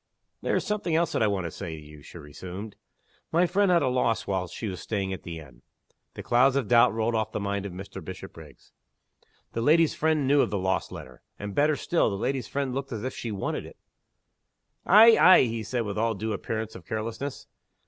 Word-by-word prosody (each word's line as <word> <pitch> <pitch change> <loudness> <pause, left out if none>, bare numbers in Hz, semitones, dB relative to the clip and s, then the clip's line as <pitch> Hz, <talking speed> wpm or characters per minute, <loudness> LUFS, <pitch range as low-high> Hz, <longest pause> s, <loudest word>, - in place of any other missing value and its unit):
"There - - 0
is - - 0
something 210 -6 -1
else 170 +1 +1
that - - -1
I 110 - +4
want 100 -3 -1
to 85 - -4
say 80 - -6
to 75 - -11
you," 75 0 -13
she 80 - -12
resumed. 90 +7 -9 0.6
"My 170 +2 +3
friend 195 +3 +2
had 175 -3 +4
a - - +1
loss 125 -3 0
while 95 -2 -2
she 90 +6 -6
was 95 -2 -5
staying 100 -3 -3
at 95 - -7
the 85 -1 -7
inn." 65 -7 -13 0.5
The - - -7
clouds 130 +3 +3
of 135 -6 0
doubt 120 +1 +5
rolled 115 +1 -1
off 110 -1 -1
the - - -2
mind 100 0 -2
of - - -8
Mr. 95 0 -8
Bishopriggs. 80 -6 -11 0.8
The 115 - -2
lady's 160 +5 +4
friend 155 -3 +1
knew 140 +1 +4
of - - +1
the 105 - -2
lost 95 -1 -1
letter. 65 -1 -10 0.2
And, 105 -1 -6
better 150 +6 +3
still, 170 0 +1
the 100 - -3
lady's 130 +4 -2
friend 140 -2 -2
looked 135 +1 -4
as 110 -2 -5
if 130 - -3
she 115 - -5
wanted 100 -2 -3
it! - - -13 1.1
"Ay! 220 +4 +8
ay!" 185 - +8
he 115 -2 -2
said, 120 +3 -2
with 105 -2 -3
all 115 0 +1
due 110 +2 -3
appearance 110 +1 -4
of 90 - -11
carelessness. 115 +8 -5
110 Hz, 220 wpm, -27 LUFS, 95-135 Hz, 1.1 s, Ay